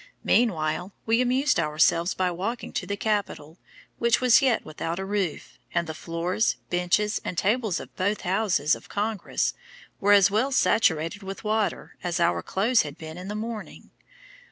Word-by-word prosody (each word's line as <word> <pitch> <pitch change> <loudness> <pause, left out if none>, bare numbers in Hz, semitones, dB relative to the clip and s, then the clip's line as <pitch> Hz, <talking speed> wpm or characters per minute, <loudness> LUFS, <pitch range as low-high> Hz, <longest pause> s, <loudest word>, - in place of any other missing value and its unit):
Meanwhile 180 -4 +1
we 230 +2 +3
amused 255 -2 +2
ourselves 160 +2 +2
by 185 -1 0
walking 205 +8 -4
to - - -3
the 200 - -3
capitol, 200 -7 -2 0.4
which 235 0 +3
was 250 -2 +5
yet 260 -4 +2
without 165 +2 -4
a 190 - -3
roof, 195 -5 -3 0.2
and 170 - +2
the 160 - -5
floors, 170 +7 -1 0.2
benches, 180 +4 +1
and 175 - -5
tables 215 -2 +1
of - - -11
both 200 +3 -1
houses 180 -5 +1
of - - -6
Congress 210 -1 -1 0.5
were 205 +1 +4
as 200 -1 +6
well 235 +7 +1
saturated 180 - +2
with 195 +2 -7
water 215 -1 -1
as 175 0 -1
our 170 0 +2
clothes 220 +5 +2
had 145 -1 -7
been 160 0 -8
in 185 - -8
the 210 - -4
morning. 220 0 -7
195 Hz, 165 wpm, -26 LUFS, 170-220 Hz, 0.5 s, as